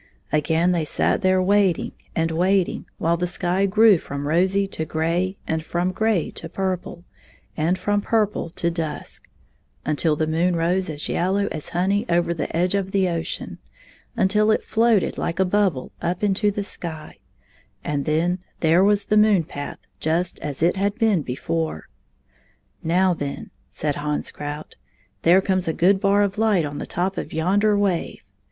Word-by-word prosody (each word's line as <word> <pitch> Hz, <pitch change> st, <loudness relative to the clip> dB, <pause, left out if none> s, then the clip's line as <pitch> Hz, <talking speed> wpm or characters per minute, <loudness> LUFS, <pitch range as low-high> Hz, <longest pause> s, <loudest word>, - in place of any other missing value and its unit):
Again 160 Hz, +3 st, +2 dB
they 170 Hz, -3 st, +1 dB
sat 155 Hz, -, 0 dB
there 185 Hz, -1 st, +3 dB
waiting 195 Hz, -2 st, +2 dB, 0.2 s
and 165 Hz, 0 st, 0 dB
waiting 185 Hz, +3 st, +1 dB
while 170 Hz, +1 st, +1 dB
the 180 Hz, +1 st, -1 dB
sky 180 Hz, +2 st, +1 dB
grew 210 Hz, -1 st, +5 dB
fi'om 140 Hz, -1 st, -6 dB
rosy 185 Hz, +6 st, +2 dB
to 160 Hz, -, -3 dB
gray, 170 Hz, +5 st, -1 dB
and 160 Hz, -1 st, -2 dB
fi 175 Hz, -, -3 dB
om 180 Hz, +1 st, +1 dB
gray 215 Hz, -3 st, 0 dB
to 165 Hz, -, -8 dB
purple, 185 Hz, -1 st, -3 dB, 0.5 s
and 165 Hz, +4 st, +1 dB
fi 205 Hz, -, -3 dB
om 205 Hz, 0 st, +2 dB
purple 210 Hz, -5 st, 0 dB
to 170 Hz, +1 st, -1 dB
dusk; 165 Hz, -2 st, -5 dB, 0.6 s
until 155 Hz, +1 st, +1 dB
the 155 Hz, -, 0 dB
moon 170 Hz, +3 st, +1 dB
rose 175 Hz, +2 st, 0 dB
as 150 Hz, -1 st, -4 dB
yellow 195 Hz, +3 st, 0 dB
as 155 Hz, -, -5 dB
honey 195 Hz, +4 st, 0 dB
over 170 Hz, 0 st, +2 dB
the 165 Hz, -, -3 dB
edge 180 Hz, +2 st, +1 dB
of 195 Hz, -1 st, -1 dB
the 190 Hz, -2 st, +2 dB
ocean; 170 Hz, -1 st, -4 dB, 0.6 s
until 210 Hz, +1 st, +3 dB
it 220 Hz, -, +2 dB
floated 225 Hz, -3 st, +2 dB
Kke 170 Hz, -, -3 dB
a -, -, +4 dB
bubble 185 Hz, -8 st, 0 dB
up 175 Hz, +3 st, -2 dB
into 205 Hz, +1 st, +2 dB
the 205 Hz, 0 st, -2 dB
sky 165 Hz, -5 st, -7 dB, 0.3 s
— -, -, -35 dB
then 155 Hz, +5 st, 0 dB, 0.2 s
there 165 Hz, +3 st, +4 dB
was 205 Hz, 0 st, +3 dB
the 215 Hz, -, +2 dB
moon 210 Hz, -4 st, +5 dB
path 145 Hz, -2 st, -7 dB, 0.2 s
just 170 Hz, +3 st, -1 dB
as 145 Hz, 0 st, -4 dB
it 175 Hz, +3 st, +3 dB
had 200 Hz, +1 st, 0 dB
been 220 Hz, -7 st, +2 dB
before. 80 Hz, -, -3 dB, 0.9 s
"Now, 180 Hz, +3 st, +2 dB
then," 145 Hz, -4 st, -5 dB, 0.2 s
said 145 Hz, -2 st, -2 dB
Hans 150 Hz, 0 st, -2 dB
Krout, 150 Hz, +1 st, -7 dB, 0.4 s
"there 180 Hz, +3 st, +5 dB
comes 185 Hz, -2 st, 0 dB
a 160 Hz, -, +1 dB
good 190 Hz, +4 st, +3 dB
bar 200 Hz, 0 st, +4 dB
of 200 Hz, +1 st, -2 dB
light 210 Hz, -7 st, +3 dB
on 145 Hz, 0 st, -5 dB
the -, -, -5 dB
top 190 Hz, +2 st, -2 dB
of -, -, -6 dB
yonder 200 Hz, +6 st, +2 dB
wave. 195 Hz, -4 st, -1 dB
180 Hz, 175 wpm, -23 LUFS, 160-195 Hz, 0.9 s, grew